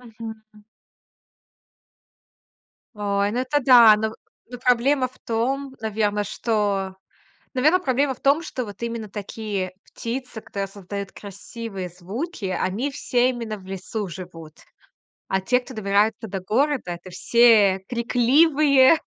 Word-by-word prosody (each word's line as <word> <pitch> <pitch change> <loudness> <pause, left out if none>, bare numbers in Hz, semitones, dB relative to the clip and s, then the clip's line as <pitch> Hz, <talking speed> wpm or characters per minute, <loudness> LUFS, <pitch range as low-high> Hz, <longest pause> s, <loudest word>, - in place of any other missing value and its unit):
Мгм. 220 -2 -11 2.3
Ой, 200 -1 0
ну, 235 - -2
это 275 +3 +1
да. 240 -4 +8
Но 220 +1 -2 0.4
но 245 - -6
проблема 255 +2 +3
в 255 - -24
том, 265 +4 -1
наверно, 210 -1 0
что 200 -3 -1 0.6
Наверно, 310 +8 +4
проблема 270 -2 +1
в - - -23
том, 280 +4 +3
что 260 -5 -4
вот 205 +1 -10
именно 230 -3 -4
такие 205 -2 -4
птицы, 240 -1 -6
которые 195 -2 -5
создают 200 0 -7
красивые 200 -1 -7
звуки, 200 - -5
они 190 +9 -1
все 250 -2 +1
именно 230 -4 -5
в 185 - -16
лесу 195 +2 -4
живут. 165 -3 -9 0.7
А 190 0 0
те, 250 +6 +2
кто 255 0 -11
добирается 215 +2 +1
до 195 0 -4
города- 255 +4 0
это 175 +2 -11
все 210 -1 +4
крикливые, 270 +4 +4
220 Hz, 125 wpm, -23 LUFS, 200-255 Hz, 2.3 s, да